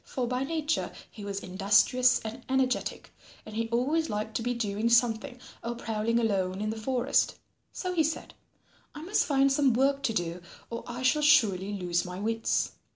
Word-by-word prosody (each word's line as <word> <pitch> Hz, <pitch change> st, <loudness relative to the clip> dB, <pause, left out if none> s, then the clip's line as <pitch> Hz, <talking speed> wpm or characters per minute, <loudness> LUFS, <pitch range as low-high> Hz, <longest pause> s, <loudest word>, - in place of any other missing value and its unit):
For 255 Hz, -, -3 dB
by 250 Hz, +2 st, -1 dB
nature 315 Hz, +1 st, -1 dB, 0.2 s
he 210 Hz, -, -10 dB
was 200 Hz, 0 st, -4 dB
industrious 205 Hz, +7 st, +3 dB
and 225 Hz, +3 st, -7 dB
energetic 260 Hz, -1 st, -1 dB, 0.3 s
and 215 Hz, -, -10 dB
he 225 Hz, 0 st, -1 dB
always 290 Hz, +7 st, +1 dB
liked 210 Hz, +1 st, -3 dB
to -, -, -4 dB
be 245 Hz, +1 st, -1 dB
doing 215 Hz, 0 st, -1 dB
something 235 Hz, +2 st, +2 dB, 0.2 s
or 235 Hz, +1 st, -3 dB
prowling 225 Hz, 0 st, -1 dB
alone 190 Hz, -4 st, 0 dB
in 215 Hz, +1 st, -1 dB
the -, -, -4 dB
forest. 250 Hz, +3 st, +1 dB, 0.4 s
So 365 Hz, -1 st, -4 dB
he 330 Hz, -3 st, +3 dB
said, 315 Hz, +1 st, -3 dB, 0.6 s
"I 300 Hz, -, -7 dB
must 385 Hz, +5 st, +1 dB
find 275 Hz, -1 st, +3 dB
some 270 Hz, -2 st, +3 dB
work 275 Hz, +2 st, +2 dB
to 230 Hz, -, 0 dB
do 175 Hz, -2 st, -2 dB, 0.3 s
or 230 Hz, -, -4 dB
I 245 Hz, +1 st, -5 dB
shall 300 Hz, +4 st, +3 dB
surely 205 Hz, -9 st, +4 dB
lose 175 Hz, -3 st, 0 dB
my 180 Hz, 0 st, -7 dB
wits. 225 Hz, +2 st, 0 dB
235 Hz, 180 wpm, -28 LUFS, 210-265 Hz, 0.6 s, surely